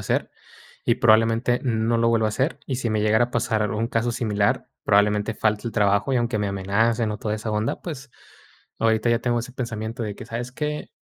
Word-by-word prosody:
hacer, -, -, -1 dB, 0.5 s
y 120 Hz, -, +2 dB
probablemente, 115 Hz, +1 st, +3 dB
no 115 Hz, -2 st, +1 dB
lo 115 Hz, 0 st, +3 dB
vuelva 115 Hz, -1 st, +2 dB
a 110 Hz, -, 0 dB
hacer, 135 Hz, +9 st, -1 dB
y 135 Hz, -, -2 dB
si 120 Hz, -2 st, -2 dB
me 110 Hz, -1 st, +1 dB
llegara 110 Hz, +3 st, +3 dB
a 120 Hz, -, -17 dB
pasar 110 Hz, -3 st, 0 dB
algún 110 Hz, +2 st, -1 dB
caso 115 Hz, +1 st, 0 dB
similar, 105 Hz, -3 st, 0 dB, 0.2 s
probablemente 105 Hz, +1 st, +3 dB
falte 110 Hz, +2 st, 0 dB
al -, -, -9 dB
trabajo, 100 Hz, +4 st, +2 dB
y -, -, +3 dB
aunque 120 Hz, -2 st, 0 dB
me 105 Hz, -1 st, 0 dB
amenacen 105 Hz, +4 st, +1 dB
o 105 Hz, -, -5 dB
toda 105 Hz, 0 st, -2 dB
esa 110 Hz, 0 st, -4 dB
onda, 105 Hz, +1 st, -1 dB
pues, 140 Hz, -6 st, -7 dB, 0.7 s
ahorita 110 Hz, +1 st, +2 dB
ya 115 Hz, 0 st, +2 dB
tengo 120 Hz, 0 st, 0 dB
ese 125 Hz, +2 st, -8 dB
pensamiento 115 Hz, -1 st, -4 dB
de 105 Hz, -2 st, -3 dB
que: -, -, -9 dB
"¿Sabes 120 Hz, +1 st, -5 dB
qué?, 150 Hz, +2 st, -4 dB
115 Hz, 210 wpm, -24 LUFS, 105-120 Hz, 0.7 s, probablemente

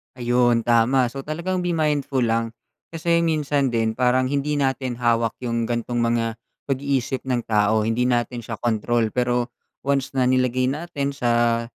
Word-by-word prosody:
Ayon, 120 Hz, -1 st, +2 dB
tama. 120 Hz, +2 st, +3 dB
So, 135 Hz, -, -7 dB
talagang 170 Hz, +5 st, -2 dB
be 175 Hz, -1 st, -1 dB
mindful 145 Hz, -4 st, 0 dB
lang, 115 Hz, 0 st, 0 dB, 0.4 s
kasi 170 Hz, +1 st, +1 dB
minsan 150 Hz, -4 st, +1 dB
din 115 Hz, -2 st, 0 dB
parang 130 Hz, +1 st, +2 dB
hindi 145 Hz, +1 st, 0 dB
natin 135 Hz, -3 st, -1 dB
hawak 115 Hz, -1 st, +1 dB
yung 115 Hz, -1 st, -1 dB
gantong 120 Hz, 0 st, -2 dB
mga 115 Hz, -1 st, 0 dB, 0.3 s
pag-iisip 135 Hz, -1 st, -1 dB
ng 125 Hz, -2 st, 0 dB
tao, 105 Hz, 0 st, +2 dB
hindi 115 Hz, +3 st, +1 dB
natin 120 Hz, 0 st, 0 dB
siya 115 Hz, +1 st, -5 dB
kontrol. 115 Hz, 0 st, 0 dB
Pero 125 Hz, 0 st, 0 dB, 0.3 s
once 135 Hz, 0 st, 0 dB
na 130 Hz, -, +2 dB
nilagay 130 Hz, 0 st, +2 dB
natin 145 Hz, -2 st, -3 dB
sa 120 Hz, -3 st, +1 dB
125 Hz, 155 wpm, -23 LUFS, 115-140 Hz, 0.4 s, tama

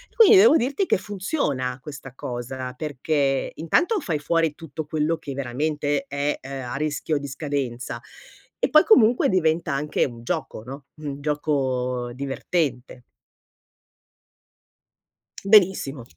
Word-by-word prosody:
Quindi 445 Hz, -2 st, +8 dB
devo 390 Hz, -4 st, +7 dB
dirti 275 Hz, +10 st, 0 dB
che -, -, +3 dB
funziona 185 Hz, -, -2 dB
questa 140 Hz, -3 st, -9 dB
cosa, 125 Hz, +1 st, -5 dB
perché 140 Hz, -1 st, -1 dB
intanto 350 Hz, -, +1 dB
fai 160 Hz, -, -2 dB
fuori 165 Hz, 0 st, +1 dB
tutto 160 Hz, -1 st, -7 dB
quello 155 Hz, +2 st, 0 dB
che 140 Hz, -, -7 dB
veramente 145 Hz, +3 st, -1 dB
è, 145 Hz, +1 st, -1 dB
uhm, 135 Hz, 0 st, -6 dB
a -, -, -3 dB
rischio 150 Hz, +1 st, -1 dB
di 140 Hz, -, -6 dB
scadenza 135 Hz, -4 st, -4 dB, 0.6 s
e -, -, +1 dB
poi 305 Hz, 0 st, +7 dB
comunque 240 Hz, -, +5 dB
diventa 160 Hz, -4 st, +1 dB
anche 150 Hz, +2 st, 0 dB
un 120 Hz, -2 st, -8 dB
gioco, 110 Hz, -, -4 dB
no, 135 Hz, +2 st, -9 dB, 0.2 s
un 145 Hz, -1 st, -5 dB
gioco 130 Hz, -5 st, -1 dB
divertente. 135 Hz, -1 st, -3 dB, 2.4 s
Benissimo. 190 Hz, -, +4 dB
145 Hz, 120 wpm, -24 LUFS, 130-165 Hz, 2.4 s, Quindi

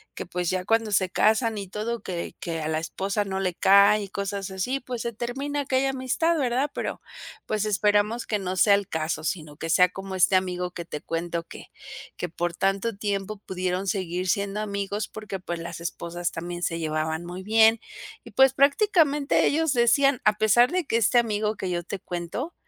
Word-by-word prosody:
que -, -, -5 dB
pues 180 Hz, -1 st, -2 dB
ya 185 Hz, -1 st, -1 dB
cuando 225 Hz, 0 st, +1 dB
se 185 Hz, -2 st, +2 dB
casan 220 Hz, +3 st, +2 dB
y 200 Hz, -2 st, -5 dB
todo 225 Hz, +3 st, -3 dB
que 175 Hz, -2 st, -5 dB
que 165 Hz, -2 st, -3 dB
a 155 Hz, -, -3 dB
la 155 Hz, -, 0 dB
esposa 195 Hz, +5 st, -2 dB
no 190 Hz, -1 st, -3 dB
le 185 Hz, -2 st, 0 dB
cae 200 Hz, +3 st, +5 dB
y 195 Hz, -, -8 dB
cosas 200 Hz, -1 st, -4 dB
así, 220 Hz, +9 st, -2 dB
pues 245 Hz, -2 st, -5 dB
se 235 Hz, -, -2 dB
termina 275 Hz, +6 st, -3 dB
aquella 270 Hz, -1 st, +1 dB
amistad, 270 Hz, +6 st, 0 dB
¿verdad? 265 Hz, +1 st, 0 dB
Pero, -, -, -4 dB, 0.4 s
pues 215 Hz, -1 st, -1 dB
esperamos 210 Hz, +2 st, +1 dB
que 210 Hz, -, 0 dB
no 185 Hz, -1 st, -3 dB
sea 200 Hz, +1 st, +6 dB
el 200 Hz, -1 st, -2 dB
caso, 155 Hz, -1 st, -2 dB
sino 155 Hz, -3 st, -3 dB
que 165 Hz, -, -5 dB
sea 180 Hz, +2 st, +5 dB
como 190 Hz, +1 st, -7 dB
este 185 Hz, +1 st, +4 dB
amigo 180 Hz, -1 st, -2 dB
que 170 Hz, -1 st, -7 dB
te 150 Hz, -, -6 dB
cuento 170 Hz, 0 st, -3 dB
que -, -, -12 dB, 0.5 s
que 180 Hz, -, -3 dB
por 175 Hz, +1 st, -2 dB
tanto 195 Hz, +4 st, 0 dB
tiempo 205 Hz, 0 st, -3 dB
pudieron 185 Hz, +1 st, -2 dB
seguir 185 Hz, -2 st, -2 dB
siendo 200 Hz, +2 st, 0 dB
amigos 200 Hz, 0 st, -3 dB
porque 210 Hz, -3 st, -6 dB
pues 175 Hz, -1 st, -5 dB
las 170 Hz, 0 st, -6 dB
esposas 170 Hz, +1 st, -4 dB
también 175 Hz, +1 st, -5 dB
se 165 Hz, -1 st, -1 dB
llevaban 160 Hz, +1 st, -2 dB
muy 180 Hz, +2 st, -7 dB
bien. 220 Hz, +2 st, +5 dB, 0.5 s
Y -, -, -11 dB
pues 265 Hz, 0 st, +5 dB
prácticamente 290 Hz, -1 st, +3 dB
ellos 320 Hz, 0 st, +1 dB
decían, 250 Hz, +2 st, +3 dB
a 215 Hz, -, +6 dB
pesar 240 Hz, -, +4 dB
de 365 Hz, -3 st, 0 dB
que 230 Hz, -, -1 dB
este 235 Hz, +2 st, +3 dB
amigo 215 Hz, -2 st, +1 dB
que 185 Hz, -, -3 dB
yo 175 Hz, -1 st, -2 dB
te 195 Hz, +2 st, -5 dB
cuento, 180 Hz, -, -5 dB
200 Hz, 200 wpm, -25 LUFS, 180-230 Hz, 0.5 s, sea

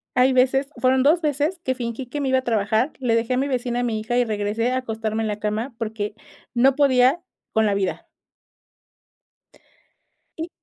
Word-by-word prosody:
hay 255 Hz, +1 st, +4 dB
veces, 265 Hz, +2 st, +2 dB
fueron 260 Hz, 0 st, +3 dB
2 315 Hz, +5 st, +4 dB
veces 300 Hz, +3 st, 0 dB
que 260 Hz, -4 st, -1 dB
fingí 240 Hz, +1 st, -5 dB
que 290 Hz, +4 st, -4 dB
me 270 Hz, -, 0 dB
iba 260 Hz, -, +3 dB
a 260 Hz, -, -7 dB
trabajar, 220 Hz, +3 st, +1 dB
le 240 Hz, -3 st, +1 dB
dejé 230 Hz, +2 st, 0 dB
a -, -, 0 dB
mi 275 Hz, -, 0 dB
vecina, 245 Hz, -2 st, -1 dB
a -, -, -1 dB
mi 225 Hz, -3 st, -1 dB
hija, 240 Hz, +3 st, -2 dB
y 245 Hz, -, +3 dB
regresé 215 Hz, +2 st, -1 dB
a 255 Hz, -, 0 dB
acostarme 225 Hz, -3 st, -3 dB
en -, -, -1 dB
la 210 Hz, 0 st, -3 dB
cama, 215 Hz, +4 st, -2 dB
porque, 215 Hz, -2 st, -4 dB, 0.4 s
no 255 Hz, +2 st, +4 dB
podía, 270 Hz, +2 st, +4 dB, 0.3 s
con 220 Hz, 0 st, +3 dB
la 205 Hz, -, +2 dB
vida. 195 Hz, -2 st, -2 dB, 2.3 s
Y 325 Hz, +2 st, -4 dB
245 Hz, 190 wpm, -23 LUFS, 220-265 Hz, 2.3 s, hay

